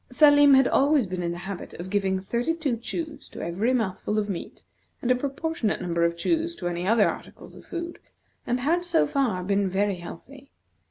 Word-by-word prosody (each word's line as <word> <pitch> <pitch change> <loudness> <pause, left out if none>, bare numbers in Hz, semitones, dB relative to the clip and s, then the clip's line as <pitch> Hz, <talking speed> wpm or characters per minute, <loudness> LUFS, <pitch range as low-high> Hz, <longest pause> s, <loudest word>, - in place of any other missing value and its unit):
Salim 290 +1 +7
had 265 -1 +5
always 280 -2 +3
been 185 -1 -4
in 170 -1 -1
the 170 - -5
habit 195 -2 -6
of 180 +2 -7
giving 195 -2 +1
thirty 235 +11 -1
two 295 -7 -1
chews 300 +5 -6
to - - -10
every 195 +9 0
mouthful 215 -3 -1
of 210 -1 0
meat, 185 - -6 0.4
and 250 - 0
a - - +5
proportionate 280 -2 -2
number 170 -2 -1
of 170 0 +1
chews 335 - 0
to 175 - -4
other 185 +6 +2
articles - - -7
of - - -13
food; 340 -1 -6 0.5
and 245 +1 0
had, 335 +6 +1
so 350 -2 +3
far, 240 -11 0
been 200 +1 +1
very 195 0 0
healthy. 265 +11 -11
235 Hz, 195 wpm, -26 LUFS, 190-290 Hz, 0.5 s, Salim